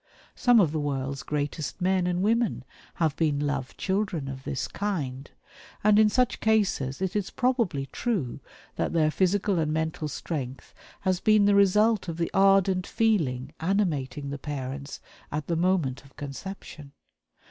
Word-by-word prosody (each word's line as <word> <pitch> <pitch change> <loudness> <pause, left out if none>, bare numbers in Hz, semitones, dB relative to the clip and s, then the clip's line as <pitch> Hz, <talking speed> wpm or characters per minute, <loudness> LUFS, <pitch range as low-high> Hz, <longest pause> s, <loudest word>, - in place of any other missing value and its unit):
Some 245 -3 +4
of 170 -8 +4
the 155 - -1
world's 140 -2 -2
greatest 150 -1 -3
men 185 -1 +2
and 180 +1 0
women 225 - +1 0.3
have 160 -4 +1
been 150 -3 +1
"love 145 -3 -2
children" 190 -7 -1
of 135 -1 -7
this 130 - -2
kind; 145 -10 -3 0.5
and 210 0 +5
in 215 -1 +6
such 250 +3 +1
cases 190 -10 +1
it 190 +1 -2
is 205 -3 -1
probably 235 - 0
true 155 - -2 0.4
that - - -1
their 155 -2 +3
physical 190 +1 +1
and 155 -1 0
mental 160 0 -2
strength 135 -3 -5 0.3
has 185 -1 +1
been 215 0 +4
the 205 - +4
result 200 +1 +4
of 165 -1 -4
the 170 -1 -1
ardent 195 -1 +4
feeling 150 - +1
animating 155 -7 -1
the 140 - -5
parents 140 -1 -5 0.3
at 150 0 -3
the 170 - -1
moment 165 -7 +1
of 135 - -20
conception. 145 0 -8
165 Hz, 155 wpm, -27 LUFS, 140-200 Hz, 0.5 s, in